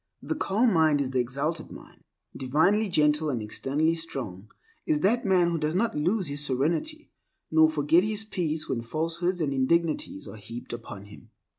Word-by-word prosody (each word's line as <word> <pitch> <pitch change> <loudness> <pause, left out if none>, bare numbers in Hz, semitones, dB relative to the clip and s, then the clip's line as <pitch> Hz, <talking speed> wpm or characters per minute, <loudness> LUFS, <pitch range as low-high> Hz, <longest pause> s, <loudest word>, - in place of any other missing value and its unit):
The - - -1
calm 220 +4 +1
mind 155 -3 +4
is 135 -2 -1
the 130 - 0
exalted 140 +7 -2
mind. - - -13 0.3
Divinely 160 +11 +2
gentle 150 -2 +2
and 125 -5 -1
externally 140 +9 0
strong 120 - -5 0.4
is 305 -2 +1
that 230 +2 +2
man 180 -3 +3
who 165 - -1
does 155 +2 -1
not 225 +4 +1
lose 180 +7 +1
his 145 -1 -3
serenity, 165 - -1 0.4
nor 160 0 +6
forget 155 +2 +3
his 215 +2 -1
peace 160 -7 -2
when 115 - -2
falsehoods 165 +8 -2
and 140 -3 0
indignities 150 - 0
are - - -9
heaped 115 +5 -8
upon 110 -4 -8
him. 105 +1 -15
155 Hz, 170 wpm, -27 LUFS, 135-175 Hz, 0.4 s, nor